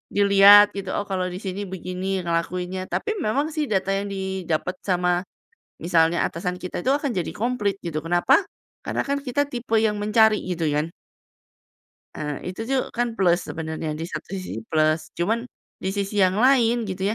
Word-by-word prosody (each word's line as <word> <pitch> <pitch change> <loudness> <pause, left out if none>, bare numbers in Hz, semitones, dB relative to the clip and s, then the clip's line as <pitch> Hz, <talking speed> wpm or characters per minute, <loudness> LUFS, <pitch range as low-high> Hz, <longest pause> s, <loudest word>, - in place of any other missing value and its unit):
dilihat 200 0 +8
gitu, 195 -2 -5
"Oh, - - -1
kalau 185 -1 0
di 180 - -5
sini 195 0 -5
begini, 185 +1 -3
ngelakuinnya." 180 +2 -2
Tapi 435 - -1
memang 280 +4 0
sih, 305 - 0
data 195 -1 0
yang 195 +1 -1
didapat 190 -3 -2
sama 180 -1 +2 0.6
misalnya 170 -1 +2
atasan 180 +2 -4
kita, 180 -1 -5
itu 260 - +1
akan 280 -2 0
jadi 180 -3 -2
komplit 210 -4 -1
gitu, 155 -2 -3
kenapa? 175 +1 +2 0.5
Karena - - -1
kan 280 - 0
kita 285 +2 0
tipe 240 -4 -1
yang 215 -1 +1
mencari 215 0 +4
gitu 175 -3 -2
kan. 150 +2 0 1.3
Eee, 150 +3 -4
itu 185 - -7
tuh 270 - +2
kan 240 0 0
plus 180 -4 +3
sebenarnya, 160 -1 -4
di - - -3
satu - - -6
sisi 185 - -5
plus, 155 0 +2 0.2
cuman 225 +8 0 0.4
di 190 - 0
sisi 200 +1 -1
yang 185 0 +4
lain 240 -3 +4
gitu 190 0 -5
190 Hz, 170 wpm, -23 LUFS, 175-215 Hz, 1.3 s, dilihat